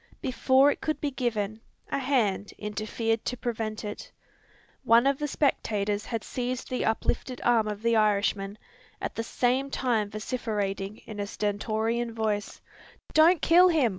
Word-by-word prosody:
Before 265 Hz, +2 st, +4 dB
it -, -, -5 dB
could 310 Hz, -2 st, -1 dB
be 290 Hz, -, -2 dB
given, 220 Hz, -5 st, -2 dB, 0.3 s
a -, -, 0 dB
hand 230 Hz, -8 st, 0 dB
interfered 215 Hz, +2 st, -2 dB
to 250 Hz, -, -2 dB
prevent 220 Hz, -3 st, -3 dB
it. 210 Hz, -, -7 dB, 0.7 s
One 230 Hz, +2 st, +5 dB
of 275 Hz, 0 st, +2 dB
the 295 Hz, -, -1 dB
spectators 210 Hz, -8 st, 0 dB
had 230 Hz, -3 st, -3 dB
seized 250 Hz, 0 st, -4 dB
the 255 Hz, -, -1 dB
uplifted 240 Hz, +3 st, -1 dB
arm 230 Hz, -3 st, +3 dB
of 210 Hz, 0 st, -5 dB
the 230 Hz, 0 st, +3 dB
Irishman, 205 Hz, -1 st, +1 dB, 0.4 s
at -, -, -4 dB
the -, -, -3 dB
same 255 Hz, +4 st, 0 dB
time 235 Hz, -6 st, 0 dB
vociferating, 210 Hz, -2 st, -3 dB
in 215 Hz, -2 st, -8 dB
a 200 Hz, -, -2 dB
stentorian 220 Hz, +3 st, -1 dB
voice 210 Hz, -2 st, -2 dB, 0.5 s
"Don't 325 Hz, +1 st, +5 dB
kill 355 Hz, +2 st, +7 dB
him! 310 Hz, -9 st, +3 dB
225 Hz, 150 wpm, -27 LUFS, 210-255 Hz, 0.7 s, kill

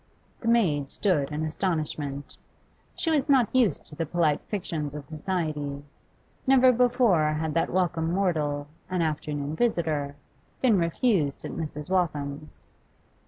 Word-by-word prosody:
The 230 Hz, -, -6 dB
maid 165 Hz, -13 st, +2 dB
stood 155 Hz, -8 st, +1 dB
in 150 Hz, +1 st, -2 dB
astonishment. 155 Hz, -4 st, -3 dB, 0.6 s
She 330 Hz, -, 0 dB
was 295 Hz, -2 st, +1 dB
not 260 Hz, -4 st, +4 dB
used 230 Hz, -, +3 dB
to 150 Hz, -, -10 dB
the 165 Hz, +1 st, -2 dB
polite 160 Hz, -3 st, +1 dB
fictions 155 Hz, -8 st, -3 dB
of 150 Hz, -1 st, -6 dB
society; 155 Hz, -4 st, -3 dB, 0.6 s
never 260 Hz, -1 st, +7 dB
before 235 Hz, -11 st, +3 dB
had 155 Hz, 0 st, -2 dB
that 165 Hz, -, +1 dB
welcome 170 Hz, -3 st, 0 dB
mortal, 155 Hz, -6 st, 0 dB, 0.2 s
an 180 Hz, -2 st, 0 dB
afternoon 150 Hz, -1 st, -2 dB
visitor, 160 Hz, -10 st, 0 dB, 0.4 s
been 230 Hz, -7 st, +4 dB
refused 170 Hz, -, +1 dB
at -, -, -4 dB
Mrs. 150 Hz, +1 st, -5 dB
Waltham's. 150 Hz, -5 st, -2 dB
160 Hz, 130 wpm, -27 LUFS, 150-195 Hz, 0.6 s, never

